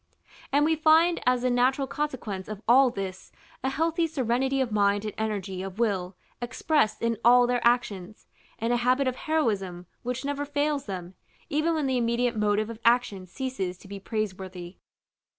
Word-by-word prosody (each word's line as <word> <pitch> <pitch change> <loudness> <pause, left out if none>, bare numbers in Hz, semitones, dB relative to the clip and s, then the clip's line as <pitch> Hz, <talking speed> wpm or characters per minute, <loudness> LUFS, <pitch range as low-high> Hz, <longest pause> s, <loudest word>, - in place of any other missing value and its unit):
And 290 +2 +3
we 320 +1 +3
find 320 +2 +4
as 250 -1 +3
the 255 - +2
natural 255 +3 +2
consequence 250 -10 -4
of 215 0 -7
all 255 +2 +6
this, 190 -4 -6 0.3
a 265 - +1
healthy 330 +4 0
serenity 265 -2 0
of 255 -4 0
mind 205 0 +2
and 210 - -4
energy 200 -4 -3
of 190 0 -7
will 195 -5 -1 0.3
expressed 240 -1 0
in 230 -2 0
all 245 +1 +7
their 245 0 0
actions, 220 -5 0 0.3
and 230 +2 0
a - - +3
habit 255 +3 +2
of 255 - 0
heroism 205 - -1 0.2
which 250 +2 -4
never 285 0 -2
fails 290 -1 -1
them, 185 -2 -6 0.4
even 315 +2 +1
when 305 -3 0
the 260 -1 +1
immediate 235 +1 0
motive 210 +1 +1
of 225 - -9
action 230 -6 +2
ceases 195 -5 -4
to 195 - -15
be 200 0 -7
praiseworthy. 190 -4 -5
240 Hz, 170 wpm, -27 LUFS, 200-270 Hz, 0.4 s, all